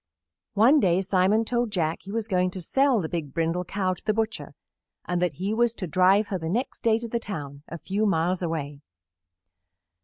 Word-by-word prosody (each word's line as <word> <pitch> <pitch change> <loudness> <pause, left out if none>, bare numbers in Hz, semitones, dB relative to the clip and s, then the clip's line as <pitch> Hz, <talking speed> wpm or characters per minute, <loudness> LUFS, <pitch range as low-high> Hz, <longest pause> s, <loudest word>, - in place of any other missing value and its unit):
One 245 +9 +6
day 180 -5 +3
Simon 195 +4 +2
told 240 0 0
Jack 165 -5 -1
he 195 - -9
was 225 0 -2
going 185 -3 +1
to - - -5
sell 270 - +2
the 165 - -2
big 155 -5 -5
Brindle 165 +2 0
Cow 185 0 -1
to - - -13
the 215 -1 0
butcher 220 0 -3 0.5
and 175 0 -1
that 180 -3 +1
he 195 +4 -2
was 235 0 +2
to 190 - -4
drive 185 +5 +3
her 190 - -2
the 160 -1 -4
next 240 +9 -2
day 225 -1 +3
to 235 +1 -5
the 235 +1 -2
town, 145 -10 -7
a 170 - -7
few 200 +5 -1
miles 180 0 +1
away. 150 -4 -4
190 Hz, 205 wpm, -25 LUFS, 170-220 Hz, 0.5 s, One